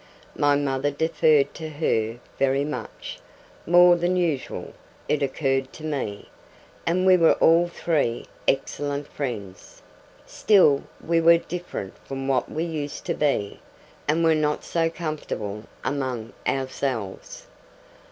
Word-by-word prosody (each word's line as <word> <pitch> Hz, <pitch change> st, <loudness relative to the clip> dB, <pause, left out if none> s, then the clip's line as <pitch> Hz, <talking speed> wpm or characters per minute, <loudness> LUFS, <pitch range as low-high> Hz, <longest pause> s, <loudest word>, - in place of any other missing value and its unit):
My 145 Hz, 0 st, +3 dB
mother 140 Hz, 0 st, 0 dB
deferred 155 Hz, -1 st, +2 dB
to 160 Hz, -1 st, -6 dB
her 115 Hz, -7 st, -1 dB, 0.2 s
very 135 Hz, +1 st, +2 dB
much 150 Hz, -, -6 dB, 0.5 s
more 175 Hz, +1 st, +7 dB
than 175 Hz, +1 st, 0 dB
usual, 165 Hz, -7 st, -2 dB, 0.3 s
it 150 Hz, -, +1 dB
occurred 135 Hz, -1 st, 0 dB
to 155 Hz, -, -11 dB
me 135 Hz, -10 st, -3 dB, 0.6 s
and 180 Hz, +3 st, +2 dB
we 185 Hz, -1 st, +7 dB
were 165 Hz, -2 st, +5 dB
all 165 Hz, +2 st, +4 dB
three 155 Hz, -8 st, -1 dB, 0.2 s
excellent 145 Hz, +1 st, -1 dB
friends; 110 Hz, -9 st, -6 dB, 0.4 s
still 180 Hz, -10 st, +4 dB, 0.2 s
we 165 Hz, 0 st, +2 dB
were 170 Hz, +1 st, +7 dB
different 175 Hz, -, -6 dB
from 135 Hz, 0 st, -6 dB
what 135 Hz, -2 st, 0 dB
we 160 Hz, -, -2 dB
used 150 Hz, -4 st, -4 dB
to -, -, 0 dB
be, 135 Hz, -9 st, 0 dB, 0.5 s
and 160 Hz, +3 st, +2 dB
were 165 Hz, -1 st, +5 dB
not 150 Hz, -1 st, 0 dB
so 165 Hz, -1 st, 0 dB
comfortable 145 Hz, -, -5 dB, 0.2 s
among 130 Hz, -5 st, -3 dB
ourselves. 130 Hz, -6 st, -3 dB
145 Hz, 125 wpm, -24 LUFS, 135-165 Hz, 0.6 s, more